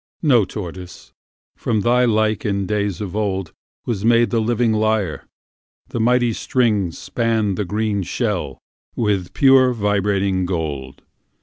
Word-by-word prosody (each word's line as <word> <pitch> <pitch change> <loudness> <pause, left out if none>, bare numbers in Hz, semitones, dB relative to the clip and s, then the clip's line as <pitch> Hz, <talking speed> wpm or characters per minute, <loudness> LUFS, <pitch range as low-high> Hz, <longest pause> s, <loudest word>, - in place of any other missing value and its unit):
No, 125 -9 +4
Tortoise: 90 -2 -9 0.4
from 110 -2 -1
thy 125 +3 +3
like 110 -2 +1
in 100 -2 -1
days 100 -1 -2
of 100 -4 -4
oldWas 100 +1 -4
made 120 +1 +3
the 115 -2 +1
living 115 0 +1
lyre; 110 -5 0 0.7
and 115 - 0
mighty 120 0 +3
stringsSpanned 110 -1 0
thy 105 - -2
green 105 +1 -1
shell 90 - -2 0.4
with 100 -6 -1
pure 135 -2 +5
vibrating 100 -3 0
gold. 70 -7 -4
105 Hz, 120 wpm, -20 LUFS, 95-115 Hz, 0.7 s, pure